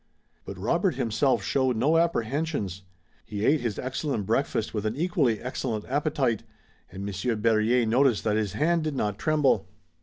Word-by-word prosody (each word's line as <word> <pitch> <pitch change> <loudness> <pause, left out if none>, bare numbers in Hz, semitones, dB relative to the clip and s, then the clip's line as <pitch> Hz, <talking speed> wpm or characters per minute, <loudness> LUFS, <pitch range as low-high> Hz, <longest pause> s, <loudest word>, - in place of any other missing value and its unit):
But - - -7
Robert - - +1
himself 125 +4 +1
showed 130 -2 +1
no 145 +8 +3
apprehensions. 140 - -1 0.4
He 105 0 -4
ate 150 +1 +3
his 115 -4 -2
excellent 130 -3 -2
breakfast 110 0 0
with 105 -2 -2
an 110 - -2
equally 145 - +1
excellent 125 -4 -3
appetite, 140 -5 0 0.5
and 95 +2 -6
Monsieur 100 +4 -2
Berryer 115 +2 +2
noticed 120 0 +3
that 105 -1 +1
his 105 -3 -1
hand 165 +7 +1
did 155 -2 -2
not 105 -5 -2
tremble. 150 - +2
120 Hz, 155 wpm, -26 LUFS, 110-145 Hz, 0.5 s, no